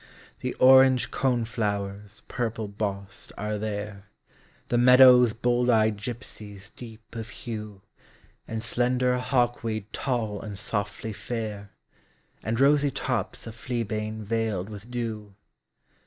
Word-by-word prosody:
The 125 - -3
orange 130 0 +6
cone 125 -3 +1
flowers 105 -2 -4
purple 115 -3 -3
bossed 100 -1 -5
are 105 +1 -3
there, 105 -2 -5 0.6
The 120 - +2
meadow's 125 -1 +8
bold 120 +2 +1
eyed 110 -2 +4
gypsies 105 -4 -8
deep 115 -2 -12
of 115 -1 -5
hue, 105 -4 -7 0.6
And 110 0 -4
slender 125 +1 +1
hawkweed 120 -4 0
tall 115 -6 -2
and 105 -3 -7
softly 105 +1 -3
fair, 105 -3 -5 0.7
And 115 +2 -2
rosy 145 +1 +4
tops 125 -6 -3
of 115 - -7
fleabane 110 -2 -3
veiled 110 -3 -1
with 105 +2 -10
dew. 110 -4 -5
110 Hz, 115 wpm, -26 LUFS, 105-125 Hz, 0.7 s, meadow's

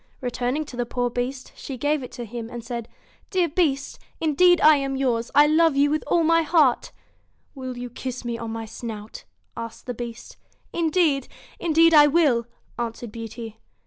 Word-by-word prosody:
Returning 250 +3 -2
to 270 - -10
the 240 -1 -2
poor 245 0 -1
Beast, 255 +2 -4
she 270 - -7
gave 295 +3 0
it 250 - -9
him, 235 -1 -6
and 240 -1 -7
said: 235 -1 -5 0.2
' - - -33
Dear 365 -3 +2
Beast! 290 -4 0 0.2
indeed 345 +3 +4
I 305 0 +7
am 275 -1 -2
yours. 240 -4 0
I 290 - +8
love 315 0 +4
you 285 +1 +3
with 310 - 0
all 340 - +3
my 330 +1 +4
heart' 305 -6 +2 0.6
'Will 260 -2 -6
you 245 0 -6
kiss 255 0 -6
me 235 -1 -2
on 230 0 -5
my 225 0 -5
snout? 220 -1 -8 0.2
' - - -45
asked 230 - -12
the 245 - -3
Beast 235 0 -8 0.4
'Indeed 320 -5 +1 0.3
indeed 330 0 +4
I 295 -1 +8
will,' 280 -7 +2 0.3
answered 235 -1 -4
Beauty. 225 0 -8
255 Hz, 180 wpm, -24 LUFS, 235-305 Hz, 0.6 s, I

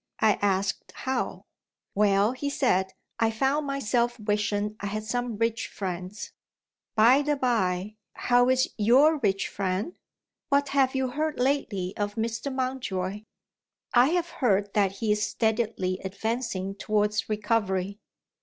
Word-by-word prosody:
I 220 -1 +3
asked 200 0 0
how. 260 -1 -3 0.5
"Well," 200 +1 +3
he 275 +3 -3
said, 190 -10 +1 0.3
"I 225 - +3
found 270 +6 0
myself 240 -3 0
wishing 210 0 -1
I 205 - -4
had 215 +1 -3
some 245 0 -2
rich 230 +1 0
friends. 185 +1 -5 0.6
By 240 +6 +6
the 295 0 +1
bye, 215 -6 0 0.2
how 245 0 +3
is 260 0 +2
your 275 +9 +5
rich 195 -5 0
friend? 195 - -2 0.5
What 280 0 +2
have 270 -1 +2
you 265 -1 0
heard 305 +3 -2
lately 230 -9 0
of 205 0 -2
Mr. 230 +4 -2
Mountjoy?" 215 -7 -3 0.7
"I 245 +1 +6
have 345 0 0
heard 205 -5 +1
that 200 -2 +2
he 210 +2 -1
is 210 0 +1
steadily 220 -5 0
advancing 200 0 -3
towards 210 +1 0
recovery." 205 -2 -1
220 Hz, 135 wpm, -27 LUFS, 200-255 Hz, 0.7 s, By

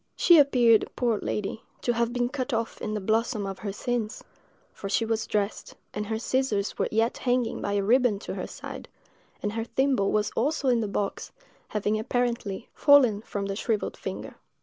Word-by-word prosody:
She 345 -3 +6
appeared, 245 -6 +5
poor 235 -4 +1
lady, 210 +2 -3 0.2
to 240 - +2
have 235 0 0
been 245 0 0
cut 260 0 -3
off 230 0 -2
in 215 0 -2
the - - -1
"blossom 220 +1 0
of 195 -1 -5
her 205 - -4
sins;" 235 +2 -3 0.5
for 195 - -6
she 195 +3 +1
was 225 0 -1
dressed, 205 0 -2 0.2
and 210 0 -3
her 220 0 -1
scissors 225 -4 -1
were - - +2
yet 225 +2 +1
hanging 245 -2 0
by 200 - -2
a 200 -1 +1
riband 230 -1 +3
to - - -5
her - - -4
side, - - -8 0.6
and 205 0 -1
her 225 0 -2
thimble 260 -4 +1
was 210 -1 +1
also 275 +2 0
in 240 -2 +3
the 215 - -1
box, 200 0 -3 0.4
having, 210 0 -1
apparently, 235 -3 -2
fallen 260 -8 +5
from 200 -2 -4
the 195 0 -3
shrivelled 215 0 -1
finger. - - -6
225 Hz, 190 wpm, -27 LUFS, 205-245 Hz, 0.6 s, She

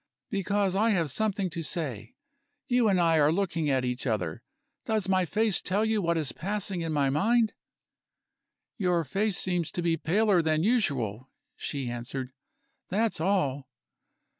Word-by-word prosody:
"Because 200 -1 0
I 220 +4 +3
have 170 -9 +1
something 205 +2 0
to 165 - -4
say. 150 - -4 0.5
You 245 -3 +3
and 190 -3 +3
I 165 -2 +4
are 150 0 +4
looking 170 -4 0
at 130 -2 +1
each 125 +1 -2
other. 95 -8 -2 0.4
Does 215 -3 0
my 185 -1 +2
face 215 +1 +1
tell 205 +4 0
you 220 -1 +1
what 170 -2 +1
is 155 -4 0
passing 200 0 -3
in 165 -1 -2
my 140 -3 +2
mind?" 220 - +2 1.3
"Your 180 -3 +2
face 195 +7 0
seems 175 -3 -1
to 175 - -2
be 165 -1 +1
paler 190 +3 +2
than 160 0 +1
usual," 135 - 0 0.3
she 140 -3 -4
answered 125 +2 -5 0.6
"that's 215 -3 0
all." 145 -8 0
175 Hz, 155 wpm, -28 LUFS, 145-205 Hz, 1.3 s, I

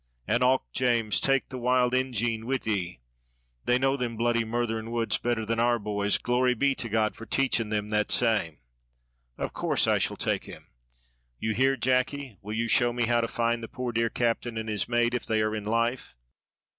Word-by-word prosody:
"An' 120 - +1
och, 130 +1 +3
James, 120 -4 +2
take 135 -1 +1
the 130 - -6
wild 125 0 +2
Ingine 120 -3 0
wid 135 0 -1
ye; 90 - -2 0.6
they 125 - +3
know 135 +1 +2
them 120 -4 -3
bloody, 120 0 +1
murthering 115 -1 -2
woods 115 -1 0
better 120 -2 -1
than 115 +1 -1
our 120 0 +3
boys, 105 -1 0
glory 125 +1 +1
be 140 +4 +2
to 120 -3 -4
God 110 0 +1
for 115 - -10
taching 125 -5 +1
them 105 -1 -2
that 105 -1 0
same." 110 -10 +2 0.8
"Of - - -4
course - - +1
I - - +2
shall - - -1
take - - -1
him. - - -12 0.7
You 110 - -1
hear, 135 +3 +2
Jacky, 130 0 0
will 105 +2 -5
you 115 +1 0
show 120 +1 +3
me 120 0 0
how 120 0 +2
to 115 - -1
find 115 0 -1
the 115 - -6
poor 125 +1 -4
dear 115 0 +1
captain 115 0 -1
and 110 0 -4
his 105 +1 -1
mate 120 0 +2
if 125 - -2
they 110 -1 +1
are 110 0 -1
in 105 -1 -5
life?" 115 - -1
120 Hz, 200 wpm, -27 LUFS, 110-125 Hz, 0.8 s, och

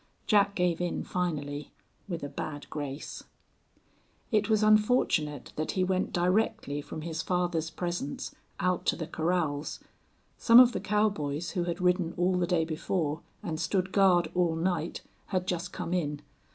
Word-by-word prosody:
Jack 200 -2 +3
gave 180 -2 +1
in 175 - -1
finally 150 -5 -3 0.4
with 170 -4 -4
a - - -2
bad 145 +1 -6
grace. 145 -1 -5 1.1
It 210 -1 +2
was 215 -1 +3
unfortunate 210 - +2
that 155 - -1
he 185 - +1
went 185 0 0
directly 175 -5 +1
from 155 +2 -7
his 165 0 -3
father's 175 -3 0
presence 175 -5 -4 0.3
out 180 0 0
to - - +3
the 160 - -4
corrals. 160 -2 -1 0.6
Some 230 +1 +8
of 250 -1 +8
the - - -2
cowboys 175 -7 0
who 175 -2 -1
had 170 0 -3
ridden 180 -2 +2
all 180 +1 +2
the 180 -1 +1
day 170 -3 +2
before 160 -1 -2 0.2
and 155 -2 -3
stood 185 +2 0
guard 180 -5 +4
all 175 -2 +2
night 170 -1 -1 0.2
had 185 -2 -1
just 180 -1 -2
come 170 - -4
in. 150 -4 -1
175 Hz, 155 wpm, -29 LUFS, 155-185 Hz, 1.1 s, Some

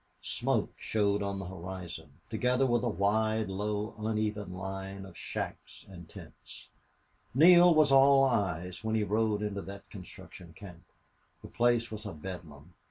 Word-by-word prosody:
Smoke - - -1
showed 100 -1 0
on 100 -1 -2
the 95 - -5
horizon, 90 -3 -8 0.2
together 125 +4 +1
with 120 -2 +2
a 120 - 0
wide, 110 +1 +1
low, 105 +2 -3
uneven 105 -2 -2
line 95 +1 -6
of 95 -3 -13
shacks - - -6
and 85 -4 -12
tents. - - -13 0.7
Neale 175 +3 +7
was 155 -2 +5
all 135 0 +6
eyes 90 -8 -1
when 110 0 -1
he 110 - +1
rode 105 0 0
into 100 -1 -3
that 100 +1 -10
construction 90 -3 -11
camp. 90 -1 -12 0.6
The - - -9
place 120 -1 +1
was 105 0 -6
a 100 - -6
bedlam. 80 -2 -9
105 Hz, 150 wpm, -30 LUFS, 95-110 Hz, 0.7 s, Neale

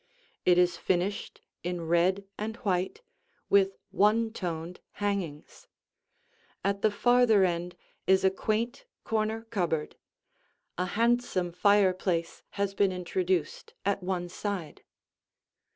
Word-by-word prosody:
It 180 -1 +5
is 175 -1 +3
finished 185 +4 -1 0.2
in 175 0 -3
red 180 +4 +2
and 220 +1 -4
white, 185 - -1 0.5
with 195 -1 +4
one 220 +2 +3
toned 170 -3 -4
hangings; 195 -8 -4 1.0
at 200 0 0
the 215 - +4
farther 230 -1 +4
end 175 0 -2 0.3
is 190 0 +4
a 190 - +5
quaint 230 - -2 0.2
corner 220 0 -1
cupboard; 165 -6 -1 0.8
a 180 +1 -1
handsome 235 -6 +1
fireplace 185 -3 +2 0.2
has 200 -1 0
been 195 -1 +2
introduced 180 -2 -2
at 200 0 +1
one 180 -1 -2
side. 180 -3 -5
190 Hz, 110 wpm, -29 LUFS, 175-210 Hz, 1.0 s, It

